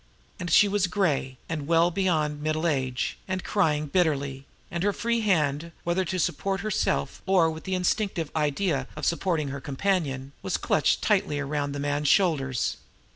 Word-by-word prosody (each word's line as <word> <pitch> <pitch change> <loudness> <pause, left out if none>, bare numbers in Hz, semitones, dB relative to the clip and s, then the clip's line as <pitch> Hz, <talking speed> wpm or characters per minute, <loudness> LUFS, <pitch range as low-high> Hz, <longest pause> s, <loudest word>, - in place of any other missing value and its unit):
And 175 -1 -4
she 205 +5 +6
was 200 -2 +1
gray, 150 -9 0
and 150 -4 -4
well 165 +1 +4
beyond 155 -5 0
middle 155 +2 -1
age, 130 -5 -1
and 185 -1 -2
crying 155 -7 +1
bitterly; 140 -5 0 0.2
and 170 - -2
her 205 +2 +2
free 235 +1 0
hand, 165 -5 +1
whether 175 +2 +1
to 185 +2 -2
support 190 +3 -1
herself 215 -1 -1
or 180 -4 +4
with 160 0 -9
the 190 - -1
instinctive 180 -3 0
idea 150 -2 0
of - - -4
supporting 170 -4 0
her 140 0 -5
companion, 140 -3 -1
was - - -1
clutched - - +1
tightly 145 - +2
around 145 0 -2
the 145 - -4
man's 145 +1 -1
shoulders. 140 -9 +2
160 Hz, 165 wpm, -26 LUFS, 145-185 Hz, 0.2 s, she